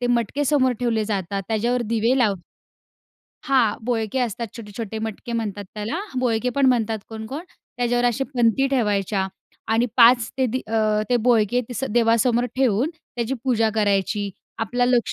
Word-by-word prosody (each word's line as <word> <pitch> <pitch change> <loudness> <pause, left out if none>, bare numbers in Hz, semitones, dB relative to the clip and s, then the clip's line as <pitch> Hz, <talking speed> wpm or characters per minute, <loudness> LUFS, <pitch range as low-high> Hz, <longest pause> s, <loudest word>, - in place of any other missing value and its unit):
ते 245 - 0
मटके 240 +4 0
समोर 265 -3 +3
ठेवले 225 -3 +1
जातात. 195 -2 -2
त्याच्यावर 235 +3 0
दिवे 230 +4 +2
लाव 215 -5 +3 1.1
हां, 250 -6 +3
बोळके 230 0 -1
असतात 235 -1 -2
छोटे-छोटे 220 0 -6
मटके 220 +2 -5
म्हणतात 210 -3 -3
त्याला. 220 - -3 0.2
बोळके 245 -1 +1
पण 275 -1 +4
म्हणतात 225 -3 +2
कोणकोण. 225 +8 -6 0.3
त्याच्यावर 245 0 +1
असे 245 +3 +1
पणती 240 +2 +3
ठेवायच्या 205 -6 0 0.5
आणि 230 +2 +3
5 235 -1 +6
ते 260 - +3
दि 255 +2 -2
अ, 215 -1 +1
ते 245 - +4
बोळके 235 0 +3
ती 245 - -6
स 265 - -2
देवासमोर 235 +1 +3
ठेवून 260 +2 +2
त्याची 245 -5 -5
पूजा 225 -4 +2
करायची. 205 -1 +1 0.3
आपला 245 +2 0
लक्ष 245 -2 +2
230 Hz, 155 wpm, -23 LUFS, 215-245 Hz, 1.1 s, 5